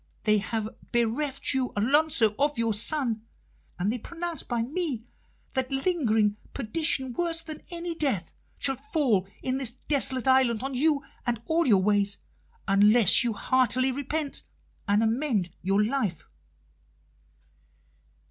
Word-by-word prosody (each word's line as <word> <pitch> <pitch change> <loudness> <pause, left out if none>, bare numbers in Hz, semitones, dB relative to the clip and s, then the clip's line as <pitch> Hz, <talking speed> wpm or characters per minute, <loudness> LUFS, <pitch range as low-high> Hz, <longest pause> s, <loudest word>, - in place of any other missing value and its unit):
They 215 -1 +4
have 220 +1 -3 0.2
bereft 250 +5 0
you, 260 -1 -1
Alonso, 245 0 +3
of 290 +1 +1
your 230 -1 +1
son, 230 0 0 0.6
and 195 +5 0
they 250 - -4
pronounce 340 +5 -5
by 235 -2 -2
me 280 -3 -3 0.5
that 260 -1 -1
lingering 245 - +1 0.2
perdition 265 +1 -1
worse 335 +2 -1
than 310 -2 -8
any 345 -1 -4
death 275 - -2 0.2
shall 270 -2 -1
fall 270 - 0 0.2
in 260 +1 -1
this 260 -4 -2
desolate 260 +1 +1
island 260 -3 +3
on 270 0 -3
you 290 +2 +1 0.2
and 235 -2 0
all 330 -1 +1
your 195 -5 +4
ways, 205 0 +1 0.5
unless 205 +2 +6
you 235 -2 0
heartily 255 +3 +2
repent 285 +2 -3 0.5
and 205 +2 +3
amend 225 - 0
your 195 +3 +2
life." 215 - -2
255 Hz, 130 wpm, -27 LUFS, 215-290 Hz, 0.6 s, unless